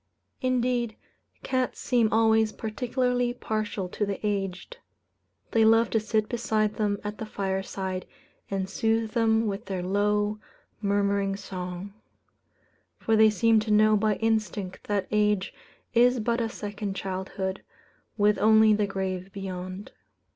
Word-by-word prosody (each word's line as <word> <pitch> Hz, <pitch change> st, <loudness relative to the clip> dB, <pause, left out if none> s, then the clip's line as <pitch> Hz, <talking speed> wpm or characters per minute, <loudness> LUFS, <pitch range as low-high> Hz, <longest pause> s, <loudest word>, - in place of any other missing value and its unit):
Indeed, 245 Hz, -3 st, 0 dB, 0.5 s
cats 255 Hz, -1 st, -1 dB
seem 235 Hz, -4 st, +2 dB
always 220 Hz, 0 st, +4 dB
particularly 245 Hz, +2 st, -1 dB
partial 215 Hz, -5 st, -3 dB
to 210 Hz, -, -3 dB
the 200 Hz, -1 st, -2 dB
aged. 200 Hz, -, -3 dB, 0.7 s
They 225 Hz, -, +4 dB
love 225 Hz, +1 st, +4 dB
to 225 Hz, -, +3 dB
sit 215 Hz, 0 st, 0 dB
beside 215 Hz, -3 st, 0 dB
them 205 Hz, -2 st, 0 dB
at 210 Hz, 0 st, -5 dB
the 220 Hz, -, -4 dB
fireside, 190 Hz, -2 st, -3 dB, 0.4 s
and 195 Hz, -1 st, -2 dB
soothe 225 Hz, +2 st, 0 dB
them 225 Hz, -1 st, +2 dB
with 205 Hz, +1 st, -3 dB
their 190 Hz, -2 st, -3 dB
low, 205 Hz, +2 st, +1 dB, 0.4 s
murmuring 200 Hz, -1 st, +1 dB
song; 185 Hz, 0 st, -6 dB, 1.0 s
for 225 Hz, -, +1 dB
they 220 Hz, 0 st, +7 dB
seem 225 Hz, +1 st, +3 dB
to 215 Hz, +1 st, -4 dB
know 215 Hz, 0 st, +5 dB
by 210 Hz, 0 st, +2 dB
instinct 215 Hz, -4 st, -2 dB
that 205 Hz, -2 st, 0 dB
age 210 Hz, -2 st, +1 dB, 0.4 s
is 245 Hz, +1 st, +4 dB
but 235 Hz, +2 st, 0 dB
a 225 Hz, -, -1 dB
second 205 Hz, -3 st, -5 dB
childhood, 190 Hz, 0 st, -4 dB, 0.6 s
with 210 Hz, 0 st, +3 dB
only 220 Hz, 0 st, +6 dB
the 210 Hz, -1 st, +1 dB
grave 190 Hz, -1 st, -3 dB
beyond. 185 Hz, 0 st, -6 dB
210 Hz, 135 wpm, -27 LUFS, 195-225 Hz, 1.0 s, they